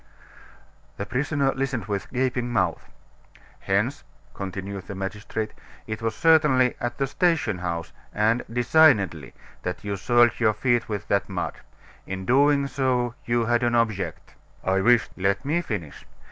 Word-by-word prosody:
The 100 - -3
prisoner 140 +3 0
listened 130 -6 -2
with 100 -3 -3
gaping 125 -1 -1
mouth. 110 - -1 0.7
"Hence," - - 0 0.3
continued 95 0 -6
the 100 - -6
magistrate, 105 +3 -4 0.3
"it 110 0 -5
was 115 -1 -1
certainly 150 -6 +4
at 120 0 -3
the 135 - +1
station 145 - +1
house, 85 -2 -4 0.2
and 110 +3 +1
designedly, 120 - +3 0.3
that 90 +1 -4
you 100 -1 -2
soiled 120 +3 +3
your 110 -2 +3
feet 120 +1 0
with 105 -1 -4
that 100 0 +1
mud. 95 -2 -4 0.5
In 95 0 -5
doing 140 +3 +4
so 130 -3 0
you 120 -1 +1
had 120 +1 +2
an 120 -1 +1
object." 95 -9 -1 0.3
"I 95 +1 +1
wished 120 +3 +4
" - - -32
"Let 100 +6 +1
me 160 +5 +1
finish. 100 - -6
115 Hz, 145 wpm, -25 LUFS, 100-130 Hz, 0.7 s, certainly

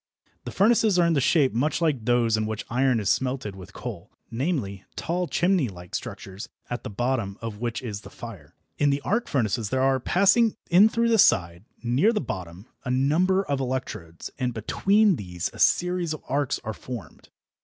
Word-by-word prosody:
The - - -5
furnaces 215 -1 +3
are 175 - +4
in 170 - +2
shape 140 0 +3
much 140 +9 0
like 150 -9 0
those 120 -2 +3
in 110 0 -1
which 110 0 -4
iron 125 -1 +2
is 105 - -3
smelted 125 -3 -1
with 95 +1 -11
coal - - -7 0.2
namely, 115 - -2
tall 175 +1 -2
chimney 175 - +1
like 90 -2 -12
structures 100 0 -6 0.2
at 120 -1 -3
the - - -5
bottom 115 -2 -2
of 115 -2 -6
which 120 +1 -3
is 105 -4 -5
the - - -12
fire. 100 -11 -11 0.2
In 145 - +3
the 140 0 0
"arc 225 +9 0
furnaces" 115 -4 0
there 130 0 +1
are, 135 0 +3
passing 200 - +3 0.2
in 195 +5 +7
through 230 +1 +1
the 225 -1 +3
side, 85 - +3 0.2
near 130 - +3
the 215 - 0
bottom, 95 - -6 0.2
a - - -5
number 160 +9 +2
of 140 -6 -2
electrodes, 125 -10 -5
and 125 -2 -1
between 195 - +2
these 90 -3 -4
a - - -12
series 180 -2 +2
of - - -13
arcs 140 0 0
are 110 - -4
formed. 115 -7 -9
130 Hz, 185 wpm, -25 LUFS, 105-170 Hz, 0.2 s, in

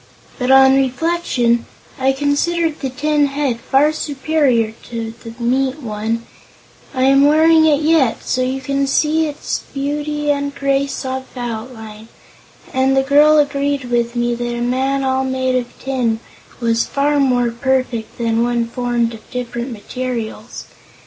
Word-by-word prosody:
But, 250 0 -1
on 265 0 +7
reflection, 260 -3 0 0.3
I 265 +1 +3
considered 295 +4 0
the 270 - -3
tin 295 +2 +1
head 275 -4 -2
far 285 +5 +2
superior 280 -6 0 0.2
to 230 -1 -5
the 230 -1 -9
meat 260 +4 0
one 225 -1 -3 0.7
I 260 -2 -1
am 275 +1 +5
wearing 315 +1 +5
it 300 -1 +3
yet, 305 -7 +2
so 255 - -1
you 260 +1 -1
can 275 +1 -1
see 310 +3 +2
its 290 - -4 0.2
beauty 295 +1 -1
and 280 0 -2
grace 275 0 -1
of 260 0 -4
outline 220 -2 -7 0.7
and 265 +1 +2
the 270 - +4
girl 295 +3 +5
agreed 285 -3 0
with 235 0 0
me 240 0 0
that 240 0 -3
a - - -4
man 265 +3 0
all 265 0 +1
made 260 0 -1
of 250 -1 0
tin 245 -4 -1 0.4
was 230 -1 +1
far 290 +1 0
more 250 -3 +2
perfect 255 -2 -2
than 230 -1 0
one 240 -1 +1
formed 240 -1 -1
of 220 -1 -13
different 245 0 -4
materials. 235 0 -5
265 Hz, 150 wpm, -18 LUFS, 240-285 Hz, 0.7 s, on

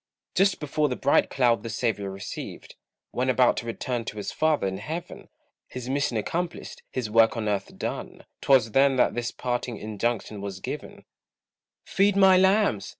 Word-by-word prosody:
Just 195 0 +2
before 150 0 0
the 125 - -2
bright 140 - +2
cloud 120 -5 +2
the 115 - -6
Saviour 110 -4 -1
received, 95 +1 -8 0.4
When 130 +1 -1
about 125 -1 +4
to 115 - -4
return 120 +1 -3
to 105 - -6
his 105 - -4
father 155 -8 +1
in 95 0 -2
Heaven; 165 +10 -7 0.4
His 125 0 -7
mission 140 -4 0
accomplished, 170 +10 -4
his 125 -4 -3
work 115 +3 +4
on 110 -1 -2
earth 100 -2 -2
done, - - -5 0.2
'Twas 125 -5 +4
then 135 +3 +4
that 125 - +3
this 120 -1 -2
parting 120 -2 -3
injunction 110 0 -3
was 100 -1 -6
given: - - -7 0.8
"Feed 200 +1 +2
my 190 -1 +6
lambs!" 190 - +3
120 Hz, 165 wpm, -26 LUFS, 110-145 Hz, 0.8 s, my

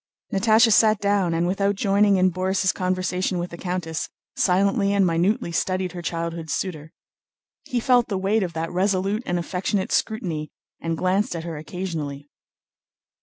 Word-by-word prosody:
Natásha 220 +3 +5
sat 215 0 +5
down 200 -4 +1
and, 170 +1 +1
without 200 +2 +1
joining 200 0 +3
in 185 0 +3
Borís' 190 +1 0
conversation 185 0 -1
with 175 0 -4
the - - -6
countess, 175 -3 -3 0.3
silently 200 +2 +2
and 200 -1 +4
minutely 170 +2 +1
studied 185 +1 -1
her 175 0 -7
childhood's 165 -1 -3
suitor. 160 -5 -4 0.7
He 245 - -1
felt 245 0 +3
the 200 - -2
weight 200 +4 +1
of 175 -3 -2
that 165 +1 -3
resolute 195 +3 0
and 175 - 0
affectionate 185 +3 -2
scrutiny 170 - -1 0.3
and 165 -1 -2
glanced 190 +5 0
at 165 - -4
her 165 -1 -5
occasionally. 150 -3 -5
185 Hz, 155 wpm, -23 LUFS, 170-200 Hz, 0.7 s, Natásha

